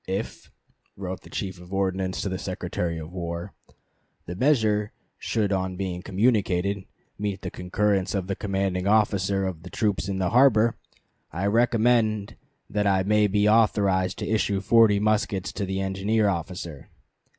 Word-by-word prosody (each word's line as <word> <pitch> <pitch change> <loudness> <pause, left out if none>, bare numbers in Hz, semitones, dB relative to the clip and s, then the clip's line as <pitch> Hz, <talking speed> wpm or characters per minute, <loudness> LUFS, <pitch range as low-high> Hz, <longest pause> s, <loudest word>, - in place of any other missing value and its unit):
"If," 95 +4 -4 0.5
wrote 95 -2 -5
the - - -15
Chief 95 -2 -5
of 90 +1 -14
Ordnance 95 -1 -1
to 100 - -2
the 95 0 -3
Secretary 90 -3 -3
of 80 +1 -7
War, 85 +1 -5 0.7
"the 90 - -6
measure 110 -4 +2 0.3
should 105 -3 -1
on 95 -1 -1
being 90 -2 -3
communicated 100 -2 +1 0.3
meet 100 -1 -3
the - - -4
concurrence 95 +1 0
of 95 -2 -1
the 100 +1 -3
commanding 95 -2 -1
officer 100 -2 +2
of 90 -4 -4
the 90 - -10
troops 105 -2 -1
in 95 - -2
the 95 -1 0
harbor, 120 -3 +5 0.6
I 90 +6 -3
recommend 110 -1 +2 0.3
that 105 -1 0
I 95 -1 +3
may 105 +1 +3
be 105 +1 +2
authorized 100 -4 +3
to - - -4
issue 105 -2 +1
forty 105 0 +5
muskets 105 -3 0
to 100 - -3
the 95 0 -2
engineer 100 +3 +1
officer." 85 -4 -4
100 Hz, 155 wpm, -25 LUFS, 95-105 Hz, 0.7 s, harbor